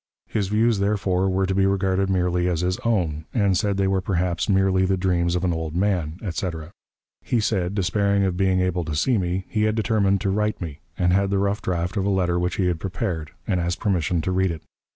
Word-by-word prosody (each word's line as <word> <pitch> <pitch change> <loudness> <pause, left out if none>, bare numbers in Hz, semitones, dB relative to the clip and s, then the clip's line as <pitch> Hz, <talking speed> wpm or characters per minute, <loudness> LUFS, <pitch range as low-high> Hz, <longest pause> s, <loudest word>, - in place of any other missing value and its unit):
His 105 -3 -2
views, 110 +1 +2
therefore, 95 -2 +1
were 95 +1 +1
to 95 - -1
be 95 0 +3
regarded 95 0 +1
merely 90 -1 +1
as 90 -2 0
his 90 +1 -1
own, 85 -9 -1
and 100 -5 +3
said 100 +1 0
they 95 -1 +2
were 95 -1 +1
perhaps 90 -1 -1
merely 95 -1 +3
the 95 0 +1
dreams 90 -2 +1
of 90 - -1
an 90 -2 +1
old 80 -1 -4
man, 90 -4 0
etc. 85 -4 -4 0.5
He 120 - 0
said, 100 -3 0
despairing 100 +1 +1
of 95 -2 0
being 95 0 +2
able 90 -1 0
to 75 -1 -3
see 115 - +2
me, 90 +1 -2
he 105 - -1
had 110 0 +1
determined 105 -3 +2
to 100 -2 0
write 105 +1 0
to - - -6
me, 75 -4 -7 0.2
and 90 0 +2
had 100 +1 +2
the 100 - +1
rough 100 +1 0
draft 90 +2 -2
of 95 - 0
a - - +1
letter 90 -3 +1
which 90 0 -1
he 95 - 0
had 90 -2 0
prepared, 90 -4 -3 0.2
and 95 -4 0
asked 85 +1 -2
permission 90 -4 0
to 95 - -2
read 95 0 +2
it. 80 -3 -5
95 Hz, 235 wpm, -23 LUFS, 90-100 Hz, 0.5 s, be